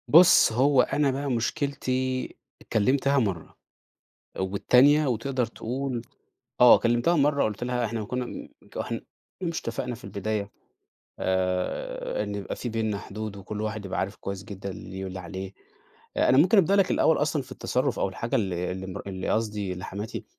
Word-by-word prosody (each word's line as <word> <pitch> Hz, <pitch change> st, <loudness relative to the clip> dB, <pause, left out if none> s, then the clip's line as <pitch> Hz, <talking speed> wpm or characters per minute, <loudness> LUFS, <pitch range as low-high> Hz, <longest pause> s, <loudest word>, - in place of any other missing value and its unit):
بُص، 170 Hz, -4 st, +7 dB
هو 130 Hz, +3 st, +4 dB
أنا 145 Hz, -2 st, +1 dB
بقى 140 Hz, +1 st, -2 dB
مشكلتي 130 Hz, +1 st, -1 dB, 0.4 s
كلمتها 135 Hz, +5 st, +3 dB
مرّة. 95 Hz, -9 st, -3 dB, 0.8 s
والتانية 125 Hz, +10 st, +4 dB
وتقدر 125 Hz, +1 st, 0 dB
تقول 125 Hz, +2 st, -4 dB, 0.6 s
آه 125 Hz, -, +9 dB
كلمتها 120 Hz, +8 st, +2 dB
مرة 145 Hz, -1 st, +3 dB
قُلت 110 Hz, +2 st, -2 dB
لها 125 Hz, -1 st, 0 dB
إحنا 110 Hz, 0 st, -3 dB
كنا 125 Hz, +3 st, -2 dB
م -, -, -7 dB, 0.2 s
ك -, -, -9 dB
إحنا -, -, -3 dB, 0.4 s
مش 170 Hz, -3 st, -1 dB
اتفقنا 125 Hz, -1 st, -3 dB
في 120 Hz, -, -16 dB
البداية 100 Hz, 0 st, -3 dB, 0.7 s
آآ 90 Hz, +2 st, -1 dB
إن 105 Hz, -1 st, -4 dB
يبقى 100 Hz, -1 st, -4 dB
في 125 Hz, -, -4 dB
بيننا 110 Hz, -2 st, -1 dB
حدود، 105 Hz, 0 st, -6 dB
وكل 105 Hz, +2 st, -6 dB
واحد 110 Hz, -1 st, -3 dB
يبقى 95 Hz, -, -3 dB
عارف 100 Hz, +2 st, -3 dB
كويس 100 Hz, 0 st, -6 dB
جدًا 100 Hz, -2 st, -6 dB
اللي 95 Hz, -, -9 dB
ليه 95 Hz, +1 st, -5 dB
واللي 95 Hz, 0 st, -5 dB
عليه. 95 Hz, +1 st, -6 dB, 0.6 s
آآ -, -, +3 dB
أنا 130 Hz, -, +5 dB
ممكن 180 Hz, +8 st, +6 dB
أبدأ 195 Hz, +1 st, +4 dB
لَك 195 Hz, -2 st, +3 dB
الأول 160 Hz, -, +4 dB
أصلًا 150 Hz, -1 st, 0 dB
في 130 Hz, 0 st, -12 dB
التصرف 130 Hz, 0 st, -1 dB
أو -, -, +1 dB
الحاجة 115 Hz, +5 st, -2 dB
ال 95 Hz, -5 st, 0 dB
اللي 90 Hz, +2 st, -3 dB
مر 95 Hz, -, -6 dB
اللي 95 Hz, -1 st, -4 dB
قصدي 105 Hz, -3 st, -1 dB
اللي 90 Hz, 0 st, -6 dB
حماتي 105 Hz, +3 st, -5 dB
115 Hz, 170 wpm, -26 LUFS, 100-130 Hz, 0.8 s, آه